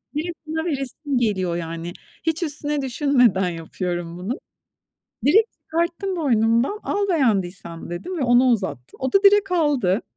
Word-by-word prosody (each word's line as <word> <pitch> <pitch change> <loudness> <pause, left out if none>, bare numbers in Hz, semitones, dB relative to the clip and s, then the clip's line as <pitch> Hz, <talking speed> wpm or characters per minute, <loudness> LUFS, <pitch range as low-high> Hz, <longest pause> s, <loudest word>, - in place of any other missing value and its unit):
direkt 335 +3 -3
ona 320 +1 -2
veresim 280 -2 -2
geliyor, 190 -7 0
yani. 165 0 -5 0.3
Hiç 325 +2 0
üstüne 295 -1 -1
düşünmeden 250 - +2
yapıyorum 175 +1 -4
bunu. 200 - -4 0.9
Direkt 430 +10 +5
çıkarttım 340 +4 -2
boynumdan, 240 - +2
"Al 400 0 -1
beğendiysen." 190 - -1
dedim 195 - -5
ve - - -1
ona 245 0 +5
uzattım. 190 - -2
O 260 - -1
da 395 - +4
direkt 400 -1 +5
aldı. 275 - +2
260 Hz, 135 wpm, -22 LUFS, -, 0.9 s, Direkt